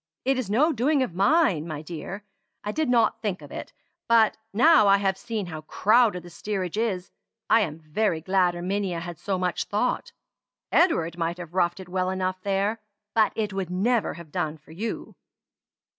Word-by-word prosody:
It 265 0 +2
is 235 -6 -3
no 295 +10 +3
doing 270 +3 +2
of 220 - -4
mine, 195 - +3
my 155 -2 -5
dear. 175 +5 -7 0.4
I 210 - -2
did 315 +2 -1
not 230 -2 +3
think 205 -4 -3
of - - -12
it; - - -7 0.4
but 230 -2 +5 0.2
now 260 +1 +6
I 195 0 +6
have 195 -1 +1
seen 215 0 -4
how 160 -3 -7
crowded 210 +3 +3
the 175 - -12
steerage 190 -1 -3
is, 205 -5 -1 0.4
I 225 - +7
am 155 -7 -2
very 165 +3 -1
glad 180 +1 +2
Erminia 185 0 -2
had 170 -1 -7
so 195 -2 -1
much 180 -1 -1
thought. 215 +5 -1 0.6
Edward 170 - +2
might 170 +1 -1
have 175 -2 -9
roughed 175 -1 +1
it 190 - -9
well 185 0 -1
enough 185 0 -2
there, 200 +3 0 0.3
but 220 -1 +4
it 210 -2 -2
would 190 -3 -3
never 210 +5 +1
have 170 -3 -11
done 155 +1 -2
for 155 +1 -19
you." 210 +8 -5
195 Hz, 185 wpm, -26 LUFS, 175-225 Hz, 0.6 s, I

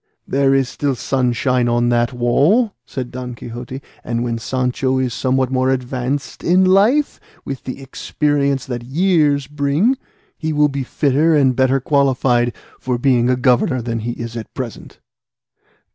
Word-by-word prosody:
"There 135 0 +2
is 135 -2 +2
still 140 0 -2
sunshine 125 0 0
on 120 0 +2
the 120 0 +2
wall," 145 - +2
said 125 -2 -5
Don 125 -1 -6
Quixote; 120 +3 -8 0.2
"and 115 0 -2
when 115 -1 -2
Sancho 130 +2 -1
is 130 -2 -1
somewhat 130 0 0
more 130 0 +1
advanced 130 +1 -3
in 185 +2 +4
life, 215 +11 +3 0.3
with 135 -2 -6
the 130 - -6
experience 140 0 -1
that 120 -3 -4
years 150 0 +2
bring, 150 - 0 0.4
he 160 -1 -2
will 150 0 +3
be 140 0 -3
fitter 145 +4 +2
and 135 -4 +3
better 130 +1 +2
qualified 130 -3 +2 0.3
for 125 -1 -2
being 125 -1 +2
a 125 - +3
governor 125 +1 +2
than 115 -1 -3
he 120 +2 -3
is 115 -1 -7
at 115 -2 -7
present." 125 -4 -7
130 Hz, 155 wpm, -18 LUFS, 120-145 Hz, 0.4 s, in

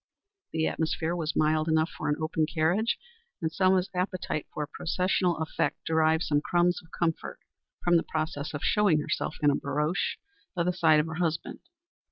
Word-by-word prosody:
The 160 0 0
atmosphere 160 +1 -1
was 160 -3 -2
mild 155 0 +2
enough 160 +1 +2
for - - -3
an 150 - +2
open 155 0 0
carriage, 175 +8 +1 0.4
and 160 -4 -1
Selma's 185 +1 +3
appetite 180 -4 -2
for 150 - -3
processional 180 +3 0
effect 160 0 -2
derived 160 0 +3
some 145 -1 +1
crumbs 175 +2 +2
of 165 - -21
comfort 165 -1 -2 0.5
from 175 -1 +5
the 165 - +1
process 155 -2 -3
of 145 - -5
showing 205 -8 +3
herself 155 - -2
in 145 - +6
a - - +1
barouche 150 +6 -1 0.4
by 175 - +1
the 180 +1 +1
side 160 -3 +4
of 150 - +1
her 160 +1 -5
husband. 160 -2 -2
160 Hz, 175 wpm, -28 LUFS, 155-175 Hz, 0.5 s, in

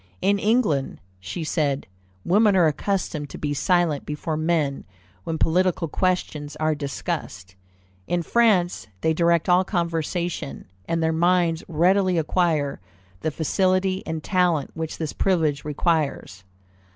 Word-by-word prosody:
"In 200 +1 +2
England," 205 - +1 0.2
she 95 - -5
said, 145 -3 -1 0.4
"women 205 +2 +4
are 180 -3 +5
accustomed 155 -2 -1
to - - -8
be 145 -1 -2
silent 170 -1 +1
before 150 +1 -4
men 155 -3 0 0.4
when 160 - -2
political 180 +1 +1
questions 150 -4 -1
are 155 0 +1
discussed. 140 - -5 0.5
In 175 -1 0
France, 195 - +2
they 160 - +2
direct 170 +1 +2
all 180 +1 +5
conversation, 170 -3 -3 0.2
and 165 0 0
their 160 0 +1
minds 170 0 +2
readily 185 +3 +2
acquire 155 -3 0 0.4
the 155 - -1
facility 185 +5 +1
and 160 -1 -4
talent 180 -7 +1
which 160 -1 -5
this 160 -3 -4
privilege 160 -7 +1
requires." 150 - -1
165 Hz, 125 wpm, -24 LUFS, 150-180 Hz, 0.5 s, are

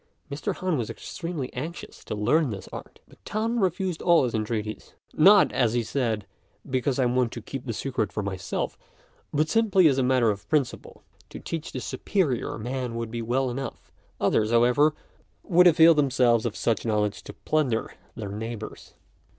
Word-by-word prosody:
Mr. 140 - -3
Han 180 -6 -1
was 115 - -3
extremely 165 -6 -6
anxious 155 +7 -7
to - - -5
learn 140 +8 +2
this 100 -4 -6
art, - - -9
but - - -21
Tan 225 +3 -1
refused 185 -2 -1
all 170 -4 +5
his 125 - -1
entreaties, 110 -1 -4 0.2
"Not," 195 +5 +6
as 120 -3 +1
he 120 -1 +1
said, 115 -4 -1 0.4
"because 130 0 0
I 130 - +2
want 125 -1 +1
to - - -5
keep 135 -1 -7
the - - -1
secret 120 0 -2
for 105 - -3
myself, 95 -1 -4 0.5
but 155 +1 +1
simply 195 -2 +4
as 135 -3 +2
a - - +2
matter 125 -3 +3
of 100 -1 -8
principle. 145 -5 -2 0.3
To - - -8
teach 165 -1 -5
the 130 - -4
superior 140 - -1
man 125 +1 -4
would 115 -1 -4
be 115 0 -3
well 125 +3 0
enough; 135 -1 -6 0.3
others, 110 0 +2
however, 125 +6 +4 0.5
would 180 +1 +5
avail 165 0 +7
themselves 125 -6 +2
of 105 - -5
such 115 - 0
knowledge 105 -2 0
to - - -8
plunder 135 -8 -1 0.2
their 105 -3 -5
neighbours. 110 +1 -7
130 Hz, 175 wpm, -26 LUFS, 115-155 Hz, 0.5 s, avail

